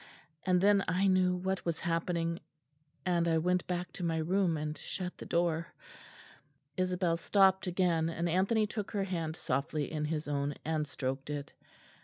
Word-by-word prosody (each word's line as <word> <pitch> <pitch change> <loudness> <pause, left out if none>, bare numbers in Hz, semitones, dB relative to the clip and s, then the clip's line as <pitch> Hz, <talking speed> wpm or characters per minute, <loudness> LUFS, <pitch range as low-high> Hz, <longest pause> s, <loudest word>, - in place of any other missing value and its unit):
And 180 -1 +4
then 200 0 +5
I 185 +4 +2
knew 185 -1 +4
what 190 +1 -2
was 170 -2 -2
happening; 170 0 -1 0.7
and 175 -2 +2
I 165 -1 +3
went 180 +2 +1
back 180 0 -3
to - - -6
my 165 -1 0
room 175 +1 +1
and 150 0 -3
shut 180 +4 -5
the - - -8
door." 170 -1 0 1.0
Isabel 180 -2 +1
stopped 190 +1 +4
again; 170 -3 +2
and 170 +1 -2
Anthony 195 +6 +2
took 210 -1 -4
her 200 -2 +1
hand 165 -4 -2
softly 145 -1 -2
in 150 -1 -1
his 155 0 -2
own 145 0 -1
and 155 -1 0
stroked 135 +1 -4
it. 145 -1 -4
170 Hz, 165 wpm, -32 LUFS, 160-185 Hz, 1.0 s, then